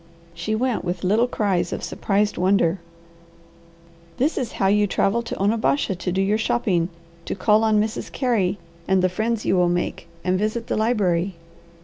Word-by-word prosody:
She 170 +6 -2
went 245 +1 0
with 175 +1 -3
little 215 +6 +3
cries 200 -7 0
of - - -4
surprised 205 0 0
wonder. 185 -1 +2 1.4
"This 285 +6 +1
is 240 -4 -3
how - - -1
you 205 +1 +3
travel 205 +4 +1
to 230 - -6
Onabasha 215 +3 +1
to 180 0 -3
do 190 +2 +1
your 210 +3 +1
shopping, 190 -7 +1 0.4
to - - -3
call 210 +3 +3
on 215 -1 +3
Mrs. 215 +1 -2
Carey 210 -8 0 0.3
and 190 -1 +3
the 185 - +3
friends 220 +4 -2
you - - +2
will 180 -1 +3
make, 175 0 -2 0.2
and 185 +1 +1
visit 220 +3 -1
the - - -2
library. 195 -5 +1
205 Hz, 170 wpm, -23 LUFS, 185-220 Hz, 1.4 s, little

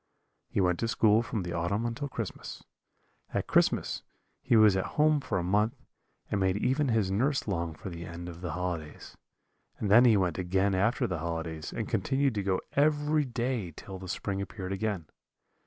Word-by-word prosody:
"He - - -1
went 90 -2 +2
to 115 - 0
school 110 -1 +4
from 115 -4 -3
the 85 0 -4
autumn 90 +7 -1
until 120 +5 -3
Christmas: 115 -6 -6 0.7
at - - 0
Christmas - - +2 0.4
he - - +2
was 110 -3 +7
at 95 - +1
home 150 0 +4
for 130 -8 -2
a 90 - -1
month, 105 +5 +2 0.6
and 105 - +1
made 95 0 +2
even 130 +6 +1
his 110 -5 +1
nurse 130 +8 +1
long 85 -5 -2
for 95 - -7
the 85 0 -7
end 85 +1 -7
of 85 0 -9
the 85 -3 -3
holidays; 90 -4 -5 0.6
and 100 - -2
then 120 +4 +8
he 115 -4 +6
went 90 -2 0
again 95 +2 +1
after 115 +8 +2
the 90 -7 -2
holidays, 80 -1 -4
and 115 - -3
continued 135 +5 +1
to 105 - -1
go 95 -1 0
every 150 +1 +2
day 120 -6 -2
till 95 -1 -8
the 95 - -8
spring 100 +2 -2
appeared 95 -1 -6
again. 95 -4 -2
100 Hz, 190 wpm, -29 LUFS, 90-120 Hz, 0.7 s, then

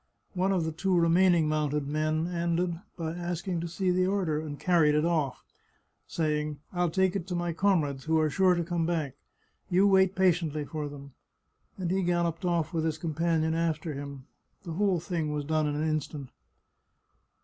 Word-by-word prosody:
One 190 +1 +1
of 180 -4 +1
the 160 - -1
two 180 +3 +1
remaining 170 -1 +4
mounted 150 -2 0
men 155 +2 0
ended 170 0 0 0.2
by 160 -2 -3
asking 175 0 -3
to 170 - -3
see 185 +2 0
the 185 +1 +2
order, 185 -6 0
and 150 -2 -7
carried 165 -4 +3
it 150 - +2
of¥, 160 -6 +1 0.7
saying, 150 -2 -1
" - - -29
I'll 175 -1 +1
take 190 +2 +1
it 190 -2 -3
to 180 - -3
my 175 -1 -1
comrades, 155 -8 +1
who 160 0 +2
are 155 - +3
sure 185 +3 +3
to 170 - 0
come 170 -1 -1
back; 160 -6 -1 0.6
you 185 +2 +4
wait 190 -1 +4
patiently 165 -5 +1
for 150 -1 -4
them," 140 -1 -11 0.6
and 180 -2 -2
he 190 +1 +1
galloped 175 -1 0
off 170 -1 0
with 160 -1 0
his 160 -1 -1
companion 160 0 0
after 165 -1 -1
him. 140 -1 -7 0.4
The 170 - -6
whole 190 0 +1
thing 165 -3 -2
was 150 -1 -3
done 155 0 +1
in 145 - -1
an 155 +2 0
instant. 150 -3 -3
165 Hz, 185 wpm, -28 LUFS, 155-180 Hz, 0.7 s, remaining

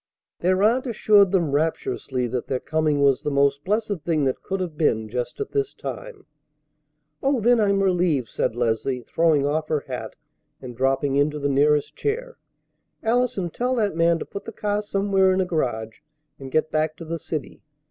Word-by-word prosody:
Their 185 +2 +2
aunt 245 +5 +3
assured 205 -4 +4
them 170 -7 +1
rapturously 140 -4 -1
that 120 0 -3
their 130 - -1
coming 155 -1 0
was 135 -2 +3
the - - -2
most 140 0 +2
blessed 205 -1 -1
thing 160 -4 +1
that 130 - -1
could 195 0 -3
have 175 -4 -4
been 110 -8 +1
just 120 +3 -4
at 420 - -4
this 415 -1 -1
time. 485 -6 -7 1.0
"Oh! 275 -2 +2
then 240 +2 +4
I'm 200 -2 +2
relieved," 175 -9 +1
said 110 - -2
Leslie, 120 +2 -1
throwing 160 0 +2
off 155 +2 -1
her 150 -2 0
hat 125 -5 -6 0.4
and 125 -2 -9
dropping 135 +2 +1
into 150 +1 +1
the 145 -1 -1
nearest 145 +1 +2
chair. 485 +3 -3 0.7
"Allison, 230 -6 0
tell 250 +6 -1
that 210 -7 0
man 170 0 +3
to - - -6
put 200 - -8
the - - -6
car 205 -1 -1
somewhere 195 -2 +2
in 185 - 0
a 190 - +2
garage 115 -10 -2 0.4
and 135 -1 -8
get 155 +1 +1
back 155 0 0
to 165 - -8
the 165 +1 -4
city. 155 -2 -6
160 Hz, 185 wpm, -23 LUFS, 140-200 Hz, 1.0 s, assured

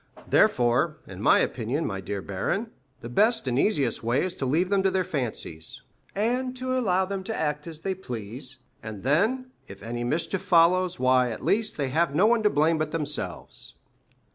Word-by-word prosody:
Therefore, 150 - +3
in 95 0 -9
my - - +5
opinion, 130 +7 -1
my 95 -2 -3
dear 100 +1 -4
baron, 195 - -2 0.3
the 115 - -7
best 215 - +2
and 125 +1 +1
easiest 140 - +1
way 120 +4 +1
is 185 - -3
to 135 - -2
leave 165 +8 +1
them 200 -1 +3
to 190 - +3
their 185 0 +1
fancies, 120 - -4 0.3
and 250 +5 -1
allow 250 -8 +1
them 195 0 -4
to 220 - -3
act 150 0 -2
as 160 -1 -6
they 190 +2 -1
please, 125 - -7 0.2
and 110 -3 -8
then, 220 - +1 0.2
if 100 0 -11
any 120 +1 -4
mischief 165 +8 -1
follows, 180 +1 +3
why, 130 -1 +3
at 115 - -6
least, 215 0 +1
they 140 -3 -1
have 155 +1 +1
no 185 +7 +4
one 230 +1 +4
to 210 - +4
blame 160 -1 +2
but 155 -1 -1
themselves." 145 - -3
155 Hz, 185 wpm, -26 LUFS, 120-195 Hz, 0.3 s, my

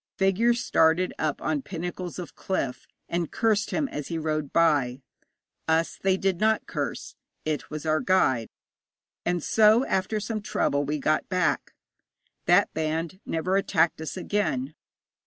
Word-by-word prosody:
Figures 230 +5 +2
started 160 +3 +3
up 155 -2 -1
on 155 -2 0
pinnacles 175 +2 -5
of 180 -2 -7
cliff, 140 -9 -3 0.2
and 170 -2 -2
cursed 215 -2 +1
him 300 -3 0
as 150 - -5
he 165 - -3
rode 155 -2 -2
by. 145 -7 +2 0.7
Us 160 +1 +1
they 190 -1 +2
did 190 -2 0
not 220 +1 +2
curse; - - -4 0.3
it 155 -1 -2
was 155 +1 -6
our 155 0 +2
guide. 130 - +2 0.8
And 175 -2 0
so 220 +3 +5
after 190 +3 0
some 215 +1 -3
trouble 145 -8 0
we 150 +2 -1
got 155 +2 0
back. 185 -1 0 0.7
That 180 +3 +4
band 160 +3 -2
never 180 +4 0
attacked 165 -4 +2
us 160 - -5
again. 155 -9 -1
170 Hz, 145 wpm, -26 LUFS, 155-195 Hz, 0.8 s, so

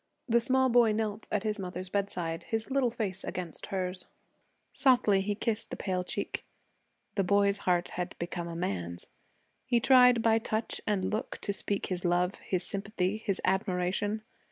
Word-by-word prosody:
The 235 -1 +4
small 260 +1 +3
boy 235 -2 +5
knelt 215 0 -2
at 210 -1 0
his 215 -1 -1
mother's 180 0 -5
bedside, 180 -5 -2
his 225 +3 -2
little 265 -2 +3
face 200 -5 -3
against 175 -3 -5
hers. 185 -2 -2 0.7
Softly 245 -7 +4
he 205 +1 -1
kissed 225 0 -1
the - - -4
pale 185 -2 -2
cheek. - - -3 0.7
The 195 - +1
boy's 200 +1 +3
heart 175 -1 +2
had 180 +1 -4
become 170 0 -4
a 170 - -6
man's. 90 - -3 0.6
He 240 - +3
tried 250 -2 +6
by 225 0 +4
touch 220 0 -2
and 195 -3 0
look 215 - -3
to 200 - -2
speak 200 0 -1
his 180 -1 -3
love, 180 +1 +2
his 185 -1 +1
sympathy, 200 -1 -1
his 210 -3 -2
admiration. 190 +2 0
200 Hz, 165 wpm, -30 LUFS, 180-220 Hz, 0.7 s, tried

